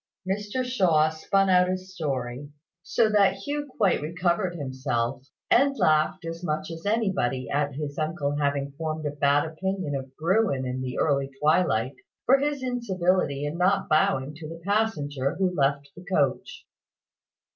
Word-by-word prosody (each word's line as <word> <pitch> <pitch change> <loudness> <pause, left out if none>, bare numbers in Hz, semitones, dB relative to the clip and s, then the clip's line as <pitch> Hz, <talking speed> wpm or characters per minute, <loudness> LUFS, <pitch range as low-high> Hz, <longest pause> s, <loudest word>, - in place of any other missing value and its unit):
Mr 205 +6 -2
Shaw 175 -11 +3
spun 195 +5 +1
out 180 -1 +4
his 185 0 -4
story, 135 -4 -3 0.3
so 220 +5 +2
that 205 -2 +4
Hugh 290 0 -4
quite 200 -8 +2
recovered 175 +3 -1
himself, 130 -3 -2 0.3
and 275 +2 +4
laughed 155 +3 +2
as 165 +1 -6
much 155 0 -2
as 165 +3 -7
anybody 190 - 0
at 145 -1 0
his 145 0 -5
uncle 155 -2 -1
having 140 -1 0
formed 155 +1 -4
a 145 - -1
bad 145 0 +2
opinion 185 0 -3
of 135 -1 -5
Bruin 170 -5 +1
in 130 +1 -3
the 130 -1 -4
early 140 -3 +1
twilight, 150 -6 +2 0.3
for 270 +3 +5
his 285 -1 -1
incivility 185 - 0
in 150 +4 -4
not 195 +2 +2
bowing 145 -2 +2
to 155 -2 -8
the 165 0 -8
passenger 150 -11 0
who 185 0 0
left 140 -2 0
the 180 - -11
coach. 145 -8 -1
160 Hz, 155 wpm, -26 LUFS, 140-190 Hz, 0.3 s, for